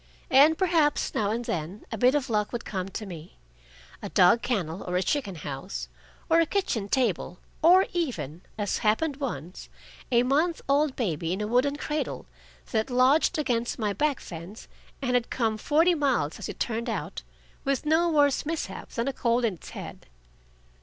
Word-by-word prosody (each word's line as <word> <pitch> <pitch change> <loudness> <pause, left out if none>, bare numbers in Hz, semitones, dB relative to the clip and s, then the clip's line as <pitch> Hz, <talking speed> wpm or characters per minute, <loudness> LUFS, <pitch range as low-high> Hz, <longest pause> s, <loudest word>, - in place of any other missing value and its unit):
And 290 +4 +6
perhaps 330 -6 +2
now 205 -2 0
and 235 +3 -2
then 175 +4 -4
a - - -2
bit 250 +4 +4
of 285 -3 0
luck 210 -3 0
would 240 -1 -4
come 190 -2 -3
to 215 +2 -6
me 170 -4 -10 0.6
a - - -5
dog 180 +6 +5
kennel 185 -8 -2
or 180 - -4
a 185 - +1
chicken 240 -5 -1
house, 145 +4 -6 0.4
or 330 0 +4
a 330 - +3
kitchen 235 - -1
table, 205 -8 0 0.2
or 360 +4 +7
even, 175 - -3 0.2
as 205 -2 -1
happened 270 +7 +1
once, 180 - -5 0.4
a 240 0 +4
month 310 +6 +1
old 280 0 +2
baby 170 - -1
in 190 - -3
a 210 - -1
wooden 250 +6 +2
cradle, 300 +1 -3 0.5
that 220 +1 0
lodged 260 +7 +3
against 240 -5 -1
my 210 -3 -1
back 290 +5 0
fence, 175 +5 -9 0.4
and 250 -1 0
had 245 -1 +1
come 225 -3 0
forty 315 +10 +3
miles, 265 - 0
as - - -5
it - - -7
turned 235 +1 -2
out, 185 -5 -4 0.4
with 275 +1 -1
no 325 +3 +3
worse 290 -3 +3
mishap 320 +1 -4
than 235 0 -2
a 275 - -1
cold 240 -1 +1
in 220 - +1
its 175 - -12
head. - - -9
240 Hz, 180 wpm, -27 LUFS, 200-290 Hz, 0.6 s, or